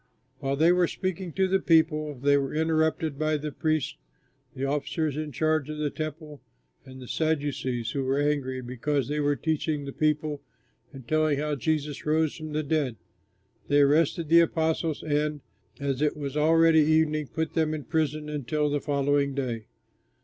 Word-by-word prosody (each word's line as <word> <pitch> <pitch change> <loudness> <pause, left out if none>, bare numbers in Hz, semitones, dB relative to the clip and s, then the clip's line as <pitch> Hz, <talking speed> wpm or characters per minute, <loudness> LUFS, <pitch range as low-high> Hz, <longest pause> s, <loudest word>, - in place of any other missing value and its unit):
While 135 0 -1
they 160 +4 +4
were 180 -1 +3
speaking 185 -1 -4
to 190 0 +2
the 190 +1 +2
people, 155 -3 +2
they 140 +3 +3
were 140 0 -1
interrupted 160 -2 0
by 155 0 +1
the 150 +1 -5
priests, 155 - -1 0.6
the 135 - -2
officer 145 +3 -1
in 150 +1 -4
charge 155 +1 0
of 155 - -5
the 150 -1 -1
Temple, 155 -1 -6 0.4
and 130 -1 -12
the 125 - -10
Sadducees, 140 -7 -1
who 140 - -2
were 135 +1 0
angry 140 -3 0
because 130 +2 -1
they 150 +1 -1
were 145 0 +2
teaching 155 -1 -1
the 140 - -6
people 150 -1 0 0.5
and 135 -4 -12
telling 155 -2 +2
how 150 +1 -1
Jesus 150 +1 -2
rose 155 0 +1
from 155 -1 -7
the 155 +1 0
dead. 145 -5 0 0.7
They 145 0 +4
arrested 155 +3 +3
the 165 +2 +7
apostles 160 -1 0
and, 150 -1 -1 0.4
as 140 -1 -2
it 150 0 +1
was 140 -2 -5
already 165 +1 +5
evening, 155 -1 +2
put 160 +3 -3
them 160 -2 +1
in 150 - -6
prison 155 -1 -1
until 150 0 -1
the 145 -1 0
following 140 -1 +1
day. 120 -5 -3
150 Hz, 170 wpm, -27 LUFS, 140-155 Hz, 0.7 s, the